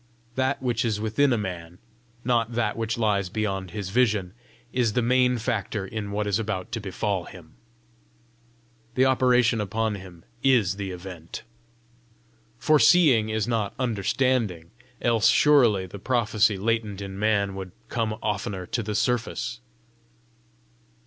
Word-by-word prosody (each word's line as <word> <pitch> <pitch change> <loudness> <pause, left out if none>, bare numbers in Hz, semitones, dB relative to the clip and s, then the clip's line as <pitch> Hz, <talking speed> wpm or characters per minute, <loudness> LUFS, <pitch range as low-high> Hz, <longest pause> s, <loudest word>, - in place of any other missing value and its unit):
That 130 +2 -1
which 120 -2 0
is 110 -3 -1
within 110 +6 +2
a 120 - +2
man, 90 -4 -6 0.5
not 120 -2 +1
that 120 0 0
which 115 0 -2
lies 100 -4 +1
beyond 95 -3 -2
his 100 0 -5
vision, 105 -6 +1 0.4
is 120 -4 +1
the 125 - +1
main 125 +1 +3
factor 110 -3 -2
in 105 0 -5
what 105 +1 -1
is 105 +1 0
about 110 -1 -3
to 115 - -2
befall 95 -1 -2
him: 85 -4 -13 1.4
the 130 - +4
operation 125 -3 +3
upon 110 +2 -1
him 95 -4 -10 0.2
is 115 -8 +3
the 100 -2 -4
event. 90 -2 -8 1.1
Foreseeing 150 -5 +5
is 110 0 -1
not 110 -4 -1
understanding, 115 -6 0 0.3
else 115 -2 +3
surely 120 -10 +4
the 95 +2 -9
prophecy 110 -3 +2
latent 110 -1 -1
in 100 -1 -7
man 100 -2 +1
would 95 -1 -7 0.2
come 115 -2 -1
oftener 100 -3 -2
to 120 - -2
the 105 -1 -4
surface! 120 +1 -1
110 Hz, 135 wpm, -25 LUFS, 100-120 Hz, 1.4 s, Foreseeing